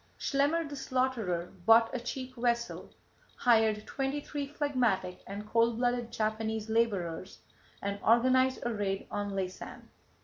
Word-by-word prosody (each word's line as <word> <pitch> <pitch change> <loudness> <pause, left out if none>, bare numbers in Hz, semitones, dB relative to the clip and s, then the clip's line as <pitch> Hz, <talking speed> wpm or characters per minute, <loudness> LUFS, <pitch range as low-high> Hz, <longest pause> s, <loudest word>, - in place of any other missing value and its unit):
Dill - - -34
Schlemmer 295 +4 +1
the 290 - -7
Slaughterer 240 -11 -1
bought 225 +3 +6
a 255 - -1
cheap 255 +1 -6
vessel, 235 -1 -1 0.5
hired 220 -3 +3
twenty 270 +1 -2
three 290 -1 -4
phlegmatic 250 - 0
and 205 +2 -6
cold 230 +1 +2
blooded 245 -1 0
Japanese 220 0 -2
laborers, 195 -6 0 0.5
and 200 0 -2
organized 255 +3 +4
a 240 - 0
raid 200 -2 -2
on 205 -1 -2
Laysan. 190 -1 -5
230 Hz, 135 wpm, -31 LUFS, 205-255 Hz, 0.5 s, bought